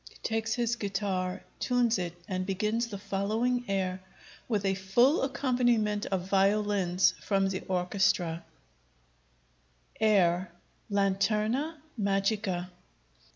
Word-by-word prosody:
[_Takes 225 0 -1
his 240 -1 0
guitar, 195 -3 -2 0.2
tunes 240 -4 +2
it, 175 -1 -5
and 185 -1 -2
begins 210 +5 -1
the 205 -3 -6
following 220 +6 -1
air 190 -1 -1 0.5
with 210 -4 -1
a 195 - +2
full 215 - +3
accompaniment 245 -6 +1
of 185 -1 -2
violins 195 -2 +2
from 195 -1 +1
the 190 -1 -3
orchestra: 180 -2 +1 1.6
_] - - -21
[_Air, 185 -4 +3 0.4
'Lanterna 210 +9 +1 0.2
Magica.' 195 -2 0
200 Hz, 105 wpm, -29 LUFS, 190-225 Hz, 1.6 s, full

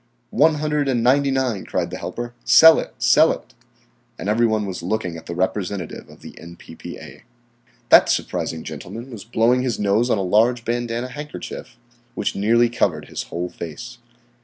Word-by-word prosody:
"One 155 +1 +4
hundred 150 -1 -1
and 120 -4 0
ninety 140 +3 +3
nine," 130 -7 -1
cried - - -3
the - - -5
helper. 120 0 -6
"Sell 160 +7 +7
it! - - -7
Sell - - +5
it!" - - -8 0.6
And 100 - -4
every 115 +2 +3
one 110 -1 0
was 95 -3 -5
looking 90 -1 -2
at 80 - -11
the 85 - -5
representative 95 -1 -3
of - - -16
the - - -10
N.P.P.A. 85 -1 -11 0.7
That - - +7
surprising 80 -1 -2
gentleman 120 +4 -8
was 110 -5 -8
blowing 120 +2 +2
his 125 -3 -1
nose 105 +4 +1
on 110 - +2
a 100 - -1
large 115 +6 +2
bandanna 120 +1 -2
handkerchief, 150 -3 -8 0.4
which - - -2
nearly 115 +4 +3
covered 85 -10 -1
his - - -4
whole 90 +1 -4
face. 120 +11 -9
115 Hz, 170 wpm, -21 LUFS, 95-125 Hz, 0.7 s, Sell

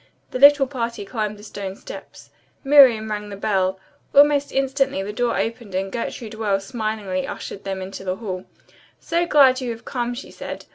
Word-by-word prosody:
The 255 - -3
little 285 0 +8
party 235 -5 -4
climbed 210 -1 -3
the 205 - -14
stone 200 -2 -6
steps. - - -11 0.3
Miriam 260 -7 +6
rang 210 0 -4
the 200 - -6
bell. 190 -2 0 0.4
Almost 285 0 +5
instantly 270 -5 0
the 205 +1 -5
door 240 +1 0
opened 225 -4 -3
and 190 +1 -2
Gertrude 230 -1 -5
Wells 200 -3 -1
smilingly 215 -5 -3
ushered 200 - -7
them 190 -1 -3
into 190 +1 -8
the 185 -1 -2
hall. 190 -3 -6 0.5
"So 340 +1 0
glad 265 -4 +5
you 250 - -3
have 230 -1 -6
come," 245 -1 -2
she 260 - -9
said. - - -7
220 Hz, 180 wpm, -22 LUFS, 195-265 Hz, 0.5 s, little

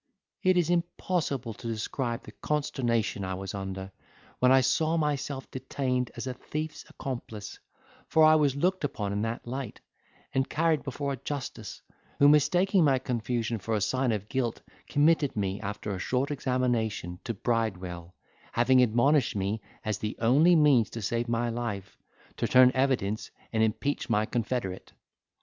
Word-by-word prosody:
'It 185 -1 +3
is 175 -1 +2
impossible 170 -8 -1
to 115 - -9
describe 115 +2 -3
the - - -11
consternation 120 -9 -1
I 95 0 -3
was 95 0 -6
under, 95 -1 -5 0.5
when 125 0 +5
I 130 0 +6
saw 160 +5 +2
myself 145 -3 -2
detained 130 -1 -2
as 120 - -5
a 130 - -3
thief's 155 +4 -5
accomplice; 115 -6 -6 0.5
for 160 - +4
I 155 0 +8
was 145 -4 +3
looked 180 +5 0
upon 105 -8 -2
in 100 - -1
that 115 +1 -3
light, 130 -1 -5 0.5
and 130 0 +1
carried 160 -2 +2
before 140 +1 -3
a - - -5
justice, 125 -6 -6 0.3
who 145 - +6
mistaking 175 +6 +4
my 140 -3 +4
confusion 120 -2 -2
for 110 +3 -2
a - - +1
sign 130 +4 +1
of 105 -2 -3
guilt 120 -1 -2 0.2
committed 150 -1 +3
me, 100 -1 -2
after 105 0 -4
a 95 - -4
short 130 +8 0
examination, 120 -9 -1
to 115 - -3
Bridewell, 95 -6 -2 0.4
having 125 +2 +4
admonished 125 +3 +3
me, 100 +2 -1 0.2
as 105 -2 -1
the 105 0 -4
only 145 +10 +5
means 145 -8 +5
to 115 - -6
save 120 +4 -1
my 120 +1 0
life, 105 -5 -4 0.4
to - - 0
turn 130 0 +7
evidence, 130 -6 0 0.2
and 110 - +2
impeach 110 +7 0
my 110 -2 +2
confederate. 115 -5 -3
125 Hz, 160 wpm, -28 LUFS, 110-140 Hz, 0.5 s, I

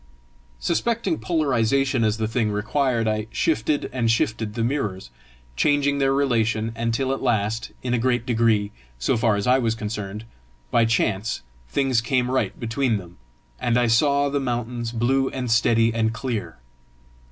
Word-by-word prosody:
Suspecting 235 - 0
polarisation 135 -5 +1
as 110 0 +1
the 110 -1 -1
thing 110 -1 0
required, 115 +3 0
I 110 0 -1
shifted 145 +9 0
and 120 -3 0
shifted 110 -1 0
the 115 - -1
mirrors, 105 - -2 0.4
changing 145 - +2
their 135 -1 +2
relation, 115 -5 +1
until 115 +4 0
at 135 - -4
last, 115 -2 0
in 125 -1 -1
a 120 - +2
great 120 -1 +1
degree, 115 -4 +2 0.3
so - - +1
far 110 -2 +2
as 100 - -2
I 125 +1 +4
was 115 -3 0
concerned, 105 -1 -5 0.5
by 115 - +4
chance, 110 - 0 0.3
things 130 - +1
came 125 0 0
right 130 - -1
between 115 0 0
them, 90 -3 -11 0.4
and 120 0 +1
I 125 - +3
saw 140 +5 +3
the 140 0 0
mountains 120 -2 -3
blue 130 +3 +1
and 125 -3 -3
steady 115 0 +3
and 110 -1 +1
clear. 115 - -4
115 Hz, 155 wpm, -23 LUFS, 110-130 Hz, 0.5 s, I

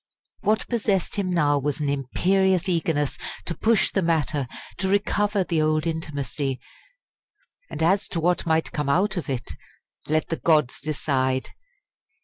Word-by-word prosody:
What 215 +1 +1
possessed 205 -5 0
him 195 -2 0
now 150 -5 +2
was 145 +2 -2
an 150 - -1
imperious 185 +7 +1
eagerness 160 -5 0 0.3
to 170 - -2
push 220 +4 +2
the 195 - +1
matter, 155 -5 0 0.3
to 190 +1 0
recover 205 0 +1
the 165 -3 0
old 155 0 +1
intimacy 145 -4 -3 1.1
and - - -3
as 190 +4 +3
to 170 - -2
what 175 +1 +1
might 160 0 +1
come 150 -2 -2
out 195 +7 +2
of 170 -7 -4
it, 125 -10 -3 0.6
let 155 +1 0
the 165 - -1
gods 150 -6 +2
decide! 130 -3 -1
160 Hz, 145 wpm, -24 LUFS, 145-190 Hz, 1.1 s, as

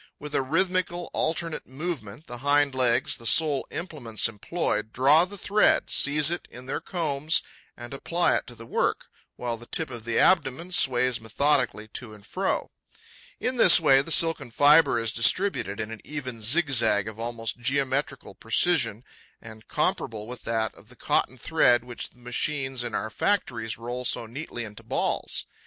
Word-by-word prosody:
With 150 0 -8
a - - +2
rhythmical, 175 +4 -1
alternate 165 0 -2
movement, 135 - -6
the 120 0 -8
hind 145 +1 +3
legs, 125 -2 +1
the 115 - -4
sole 150 +1 +3
implements 150 - -2
employed, 110 0 -3
draw 145 +8 +4
the 200 +2 -10
thread, 210 +2 +2
seize 150 +2 +4
it 175 - -4
in 125 +1 -12
their 135 - -4
combs 155 -3 -1 0.3
and 120 +2 -9
apply 170 +5 +1
it - - -6
to 120 - -11
the 115 - -12
work, - - -1 0.3
while 120 -1 -4
the 120 +1 -13
tip 160 -4 -3
of 120 -2 -7
the 115 0 -2
abdomen 170 0 +2
sways 125 - +3
methodically 125 -1 0
to 110 -1 -8
and 100 -1 -17
fro. 190 - -2 0.7
In 255 0 -2
this 185 -6 +8
way, 135 -5 +5
the 140 - -8
silken 165 -5 +2
fibre 145 +2 +5
is 115 -1 -2
distributed 115 - +2
in 110 0 -4
an 115 - -8
even 130 -6 -6
zigzag, 120 - +2
of 110 0 -8
almost 115 0 -4
geometrical 135 +2 -1
precision - - 0 0.4
and 110 -1 -13
comparable 110 -2 -1
with 125 +2 -9
that 110 -2 -1
of 110 - -19
the 125 - -15
cotton 130 - 0
thread 125 -4 +3
which 120 -1 -7
the - - -28
machines 130 +1 -2
in 120 -3 -4
our 110 - -3
factories 115 - -1
roll 120 +2 -5
so 115 - -1
neatly 120 0 -6
into 105 -2 -10
balls. - - -1
130 Hz, 170 wpm, -26 LUFS, 115-155 Hz, 0.7 s, this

